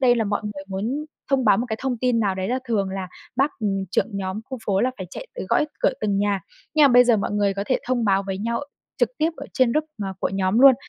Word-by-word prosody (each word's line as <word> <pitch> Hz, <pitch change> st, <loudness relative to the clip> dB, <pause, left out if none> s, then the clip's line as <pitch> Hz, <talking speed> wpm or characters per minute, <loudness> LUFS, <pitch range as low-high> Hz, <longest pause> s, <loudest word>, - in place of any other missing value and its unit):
đây 245 Hz, -2 st, +5 dB
là 225 Hz, -, +1 dB
mọi 205 Hz, 0 st, -1 dB
người 200 Hz, -2 st, -6 dB
muốn 225 Hz, +10 st, -2 dB, 0.3 s
thông 270 Hz, -2 st, +3 dB
báo 205 Hz, -3 st, +6 dB
một 240 Hz, -, -1 dB
cái 220 Hz, -, -2 dB
thông 260 Hz, -3 st, -1 dB
tin 245 Hz, -1 st, +2 dB
nào 200 Hz, -3 st, +1 dB
đấy 185 Hz, 0 st, -3 dB
là 250 Hz, +2 st, +1 dB
thường 200 Hz, -4 st, +1 dB
là 190 Hz, -1 st, -4 dB, 0.3 s
bác, 275 Hz, +4 st, +3 dB
ừm, 195 Hz, -3 st, 0 dB
trưởng -, -, +2 dB
nhóm 190 Hz, +1 st, -3 dB
khu 260 Hz, 0 st, -6 dB
phố 195 Hz, -1 st, +2 dB
là 255 Hz, -, +2 dB
phải 185 Hz, -, -5 dB
chạy -, -, -7 dB
tới -, -, -5 dB
gõ -, -, +3 dB, 0.2 s
cửa -, -, +3 dB
từng 205 Hz, -2 st, +1 dB
nhà, 200 Hz, -1 st, +1 dB, 0.3 s
nhưng 305 Hz, -1 st, +6 dB
mà -, -, +8 dB
bây 245 Hz, -1 st, +7 dB
giờ 240 Hz, -2 st, +4 dB
mọi 200 Hz, -, -1 dB
người 205 Hz, -1 st, +1 dB
có 200 Hz, +1 st, -2 dB
thể 255 Hz, -, +2 dB
thông 245 Hz, -2 st, +1 dB
báo 195 Hz, -1 st, +3 dB
với 190 Hz, -1 st, -3 dB
nhau 230 Hz, +3 st, -1 dB, 0.4 s
trực -, -, +3 dB
tiếp 320 Hz, +2 st, +2 dB
ở -, -, -7 dB
trên 255 Hz, -4 st, +3 dB
group 305 Hz, +3 st, +1 dB
mà 195 Hz, -2 st, -3 dB
của -, -, +1 dB
nhóm 195 Hz, +2 st, +1 dB
luôn, 270 Hz, -1 st, +9 dB
215 Hz, 280 wpm, -23 LUFS, 195-250 Hz, 0.4 s, luôn